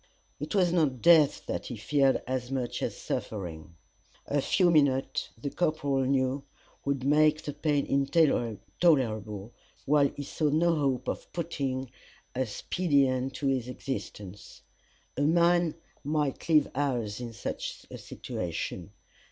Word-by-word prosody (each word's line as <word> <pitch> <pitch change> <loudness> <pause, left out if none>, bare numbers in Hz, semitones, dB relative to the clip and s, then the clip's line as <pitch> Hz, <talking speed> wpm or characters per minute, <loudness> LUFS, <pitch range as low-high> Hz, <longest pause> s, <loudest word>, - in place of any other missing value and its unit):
It 150 +7 -4
was 180 -3 +3
not 150 -8 +2
death 160 -4 +5
that - - -4
he 120 - -6
feared 135 +4 +2
as 125 -1 -3
much 130 -3 -3
as - - -2
suffering. 85 -5 -5 0.5
A 145 0 0
few 175 +5 +3
minutes, 140 -4 +2
the 140 +4 -4
corporal 155 -5 0
well 135 -1 +2
knew, 135 +1 +1 0.4
would 140 -2 -1
make 155 +2 +3
the 145 - -4
pain 145 -2 0
intolerable, 120 - +1 0.3
while 145 0 +4
he 145 - -5
saw 150 +2 -1
no 165 +3 +3
hope 135 -5 0
of - - -4
putting 135 -6 -3 0.4
a 130 0 -1
speedy 140 - +1
end 130 +1 -2
to 145 - -4
his 130 -3 +1
existence. 105 -6 -7 0.5
A - - 0
man 170 +2 +3 0.3
might 150 0 -1
live 155 -3 +5
hours 125 -7 -1
in 120 -1 -5
such 115 - -5
a - - -7
situation. 85 -2 -5
140 Hz, 140 wpm, -29 LUFS, 125-155 Hz, 0.5 s, death